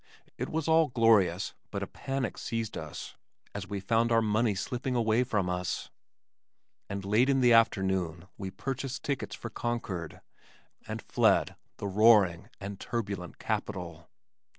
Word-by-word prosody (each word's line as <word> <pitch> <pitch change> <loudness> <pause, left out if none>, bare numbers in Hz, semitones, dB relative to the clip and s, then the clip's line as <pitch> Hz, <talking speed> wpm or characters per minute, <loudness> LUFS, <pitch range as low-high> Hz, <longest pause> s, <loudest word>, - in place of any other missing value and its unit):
It - - -4
was 160 -1 -2
all 160 0 +5
glorious 105 - +3 0.2
but - - -3
a - - -1
panic 135 -1 -3
seized 115 -2 -3
us - - -7 0.4
as 100 0 -5
we 100 -1 -3
found 115 +4 +1
our 115 -1 +4
money 110 0 +2
slipping 125 +6 -2
away 115 0 +3
from 105 -7 0
us, 90 0 -3 1.0
and 100 -1 -4
late 110 +7 +3
in 135 -1 +3
the 125 -2 +5
afternoon 95 -6 +2
we 95 -1 -5
purchased 135 +5 -4
tickets 140 -2 -2
for 120 - -7
Concord, 105 -9 -4 0.7
and - - -5
fled - - +3 0.2
the - - -5
roaring 100 -2 +5
and 100 0 -6
turbulent 100 -7 -4
capital. 85 -5 -4
110 Hz, 145 wpm, -30 LUFS, 95-120 Hz, 1.0 s, all